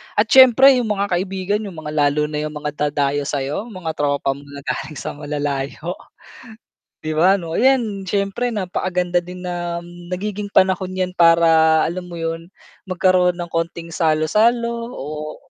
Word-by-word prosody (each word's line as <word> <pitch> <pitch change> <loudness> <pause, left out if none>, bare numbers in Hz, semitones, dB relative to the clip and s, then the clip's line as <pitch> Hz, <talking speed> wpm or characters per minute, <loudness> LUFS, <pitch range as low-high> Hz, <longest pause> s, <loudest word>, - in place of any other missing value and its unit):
at 210 - +4
s'yempre 260 +1 +8
yung 235 - -2
mga 200 -1 -1
kaibigan, 195 +2 -2
yung 185 - -9
mga 150 - -5
lalo 150 +1 +1
na 150 - -2
yung 150 - -9
mga 150 - -2 0.2
dadayo 145 0 -1
sa'yo, 145 - -3
mga 185 -7 -5
tropa 140 -2 0
mo 140 +1 -9
na 140 0 -10
galing 155 - -4
sa - - -5
malalayo. 145 +3 -4 1.1
'Di 155 - -2
ba, 180 +5 +4
'no? 170 -1 -3
'Yan, 225 -8 +1
siyempre, 200 +5 -1
napakaganda 180 -4 -1
din 180 +1 -10
na 175 -1 -4 0.2
nagiging 205 +2 -4
panahon 185 -1 +1
'yan 185 -1 -1
para 165 -2 +5
alam 180 +1 -4
mo 175 - -8
'yun 165 0 -4 0.4
magkaroon 180 -1 +2
ng 175 -1 -6
konting 165 0 -3
salo-salo, 230 +10 +1
o 150 +2 -6
175 Hz, 155 wpm, -20 LUFS, 155-195 Hz, 1.1 s, s'yempre